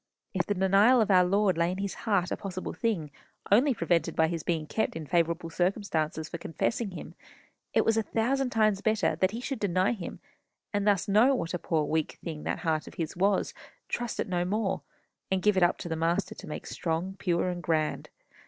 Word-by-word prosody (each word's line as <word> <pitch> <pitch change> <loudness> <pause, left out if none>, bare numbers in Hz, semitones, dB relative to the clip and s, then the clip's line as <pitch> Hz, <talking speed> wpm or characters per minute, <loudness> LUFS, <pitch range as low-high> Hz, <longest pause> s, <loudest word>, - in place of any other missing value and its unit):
_ - - -55 0.3
If 180 -2 0
the 205 - 0
denial 195 +7 +5
of 215 -2 +2
our 180 -1 +6
Lord 190 -1 +2
lay 170 +1 +3
in 185 - -3
his 200 0 -3 0.2
heart 185 -4 +2
a - - +1
possible 185 -2 -5
thing, 185 -11 -1 0.4
only 250 +8 +5
prevented 170 - 0
by 160 0 +3
his 165 -1 -3
being 160 -2 -1
kept 220 +8 -1
in 160 -1 -5
favourable 170 +1 0
circumstances 165 -4 -1
for 170 - -6
confessing 215 +7 -2
him, 185 - -8 0.6
it - - +2
was 225 0 +3
a - - +4
thousand 250 +5 0
times 215 -4 +2
better 220 0 +1
that 185 - +3
he 225 +4 -5
should 265 0 -4
deny 185 -2 +2
him, 200 -7 -6 0.5
and 205 0 0
thus 200 -2 +3
know 225 +7 +5
what 165 -8 -3
a 180 - -1
poor 160 -2 0
weak 160 0 -1
thing 160 -3 -5
that - - -2
heart 155 -1 0
of - - -11
his 165 -2 -3
was, 195 +2 +1 0.4
trust 240 -1 -3
it - - 0
no 175 -2 0
more, 195 +1 -1 0.5
and 190 -1 0
give 210 -1 +4
it 185 - +2
up 175 - +4
to - - -6
the 165 - -2
Master 165 +2 0
to - - -11
make 150 - -5
it - - -9
strong, 165 +1 -1
and 190 0 -12
pure, 175 -1 +1
and 175 -1 -4
grand. 155 -1 -1
185 Hz, 225 wpm, -29 LUFS, 165-210 Hz, 0.6 s, our